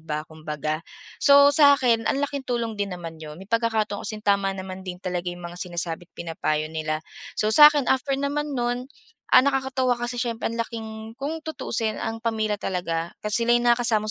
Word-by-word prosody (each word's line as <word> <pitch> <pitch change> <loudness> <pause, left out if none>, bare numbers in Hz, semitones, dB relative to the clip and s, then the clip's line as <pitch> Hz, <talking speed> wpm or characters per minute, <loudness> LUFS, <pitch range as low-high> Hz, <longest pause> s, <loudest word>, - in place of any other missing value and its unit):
ba 155 -1 -4
kumbaga. 155 0 -4 0.4
So 280 0 +7
sa'kin 270 -6 +5
ang - - +1
laking 280 -2 -6
tulong 235 -2 -1
din 200 - 0
naman 165 -2 -9
'yun, 155 -1 -8
may 190 - -10
pagkakataon 220 -1 0
kasing 215 -2 -6
tama 200 -1 +2
naman 190 0 -7
din 185 -1 -6
talaga 180 -1 -3
'yung 175 0 -7
mga 175 +1 -8
sinasabi't 175 -1 -3
pinapayo 155 -2 -2
nila, 155 0 -3 0.3
so 215 0 +1
sa'kin 295 +1 +8
after 270 +2 +1
naman 285 +1 -2
nun, 245 +1 -2 0.4
ah, - - +8
nakakatuwa 265 -2 +1
kasi 240 0 -4
siyempre 235 -2 -2
ang 230 - -5
laking 220 -1 -5
kung 285 +6 -4
tutuusin 225 -8 -2
ang 225 0 -3
pamilya 220 -2 -1
talaga 170 -3 -3
kasi 215 +2 0
sila'y 240 0 +4
nakakasama 235 -3 +2
220 Hz, 175 wpm, -24 LUFS, 175-245 Hz, 0.4 s, sa'kin